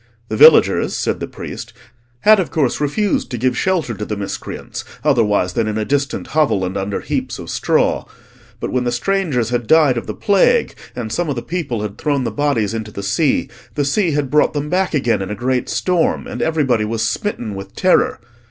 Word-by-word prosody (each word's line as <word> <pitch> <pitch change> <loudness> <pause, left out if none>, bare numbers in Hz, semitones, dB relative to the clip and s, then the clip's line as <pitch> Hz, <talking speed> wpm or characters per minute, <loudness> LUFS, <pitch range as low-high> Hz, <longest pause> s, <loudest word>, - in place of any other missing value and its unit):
The 110 - -2
villagers, - - +6
said - - -1
the - - -4
priest, - - -8 0.5
had 215 0 +6
of 180 - -1
course 145 -3 0
refused 190 +8 0
to 125 - -4
give 125 +2 +1
shelter 175 -9 0
to 105 0 -6
the 105 0 -4
miscreants, 100 -1 -6 0.2
otherwise 105 -10 +2
than 115 +1 0
in 110 0 -2
a 110 - -1
distant 140 +2 -1
hovel, 115 -12 +2
and 90 +1 -4
under 100 0 -2
heaps - - -3
of - - -7
straw. - - +1 0.5
But - - -4
when 125 -1 0
the 120 - 0
strangers 130 - 0
had 120 -2 -1
died 150 -6 +5
of - - -11
the - - -4
plague, 205 - +3 0.2
and 115 -3 -5
some 170 +5 -1
of 140 - -1
the 120 - -4
people 145 -11 -3
had 105 -1 -6
thrown 145 -3 0
the - - -2
bodies 130 -8 0
into 110 -1 -4
the 100 -1 -7
sea, 135 +9 +1 0.3
the 145 -2 0
sea 165 +4 +1
had 145 -2 -1
brought 150 0 +3
them 150 +1 -3
back 185 -2 +1
again 115 -7 +1
in 95 - -4
a 105 - -3
great 125 +3 -1
storm, 180 -3 0
and - - -6
everybody 140 -8 +1
was 110 +1 -1
smitten 120 - -3
with 95 0 -8
terror. 185 -1 +2
130 Hz, 210 wpm, -18 LUFS, 110-155 Hz, 0.5 s, villagers